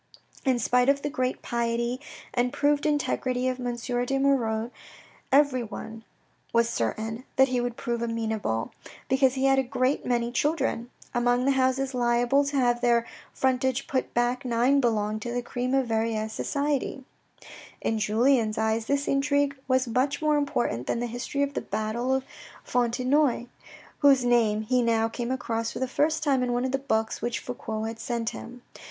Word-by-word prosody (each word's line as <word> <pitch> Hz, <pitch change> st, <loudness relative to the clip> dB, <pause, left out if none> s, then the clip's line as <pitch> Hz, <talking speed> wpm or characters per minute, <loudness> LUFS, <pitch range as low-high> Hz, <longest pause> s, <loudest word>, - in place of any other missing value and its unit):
In 260 Hz, -2 st, +3 dB
spite 250 Hz, +2 st, +2 dB
of 280 Hz, 0 st, +2 dB
the 290 Hz, -, -2 dB
great 255 Hz, -3 st, -2 dB
piety 235 Hz, +1 st, -1 dB, 0.3 s
and 245 Hz, 0 st, +1 dB
proved 290 Hz, +1 st, +1 dB
integrity 255 Hz, -4 st, 0 dB
of 255 Hz, 0 st, -1 dB
M. 245 Hz, -1 st, -2 dB
de 245 Hz, +2 st, -1 dB
Moirod, 240 Hz, -5 st, +1 dB, 0.6 s
everyone 245 Hz, -5 st, +1 dB, 0.5 s
was 235 Hz, 0 st, +3 dB
certain 220 Hz, -, -2 dB
that 265 Hz, 0 st, +5 dB
he 250 Hz, -1 st, 0 dB
would 245 Hz, -1 st, -3 dB
prove 235 Hz, -1 st, -2 dB
amenable, 220 Hz, -, -2 dB, 0.4 s
because 265 Hz, 0 st, +3 dB
he 265 Hz, 0 st, 0 dB
had 270 Hz, 0 st, +4 dB
a -, -, +2 dB
great 255 Hz, +2 st, 0 dB
many 240 Hz, -1 st, 0 dB
children. 270 Hz, -4 st, 0 dB, 0.2 s
Among 245 Hz, +1 st, +2 dB
the 275 Hz, -, +4 dB
houses 265 Hz, 0 st, +1 dB
liable 245 Hz, +3 st, +2 dB
to 280 Hz, +1 st, -3 dB
have 240 Hz, -2 st, +2 dB
their 235 Hz, -1 st, +3 dB, 0.3 s
frontage 260 Hz, 0 st, 0 dB
put 260 Hz, -1 st, -2 dB
back 240 Hz, +2 st, +1 dB
nine 250 Hz, +3 st, +2 dB
belonged 215 Hz, -3 st, 0 dB
to 240 Hz, -, -4 dB
the 245 Hz, 0 st, -2 dB
cream 250 Hz, +2 st, -2 dB
of 270 Hz, -1 st, +2 dB
Verrieres 220 Hz, -1 st, -1 dB
society. 280 Hz, -1 st, -2 dB, 0.8 s
In 225 Hz, -, -1 dB
Julien's 220 Hz, +1 st, +2 dB
eyes 220 Hz, +1 st, 0 dB
this 280 Hz, 0 st, 0 dB
intrigue 285 Hz, 0 st, +1 dB
was 260 Hz, -1 st, +2 dB
much 255 Hz, +5 st, 0 dB
more 305 Hz, -1 st, +2 dB
important 270 Hz, -, -1 dB
than -, -, 0 dB
the 240 Hz, -, -1 dB
history 245 Hz, +4 st, -2 dB
of 280 Hz, 0 st, -2 dB
the -, -, -2 dB
battle 225 Hz, +4 st, -2 dB
of 265 Hz, 0 st, +1 dB, 0.4 s
Fontenoy, 250 Hz, +2 st, +1 dB, 0.5 s
whose 275 Hz, -3 st, +5 dB
name 225 Hz, -3 st, +3 dB
he 250 Hz, +3 st, +2 dB
now 225 Hz, -1 st, +2 dB
came 235 Hz, +1 st, -4 dB
across 230 Hz, -3 st, -2 dB
for -, -, -6 dB
the 260 Hz, +1 st, -1 dB
first 310 Hz, +5 st, +1 dB
time 275 Hz, -4 st, +2 dB
in 250 Hz, -1 st, 0 dB
one 245 Hz, +1 st, 0 dB
of 260 Hz, -, -1 dB
the 270 Hz, -, 0 dB
books 225 Hz, -5 st, -1 dB
which 240 Hz, -1 st, -1 dB
Fouque 220 Hz, -3 st, -5 dB
had 225 Hz, 0 st, -5 dB
sent 230 Hz, -1 st, -2 dB
him. 245 Hz, +1 st, -10 dB
245 Hz, 170 wpm, -27 LUFS, 230-270 Hz, 0.8 s, that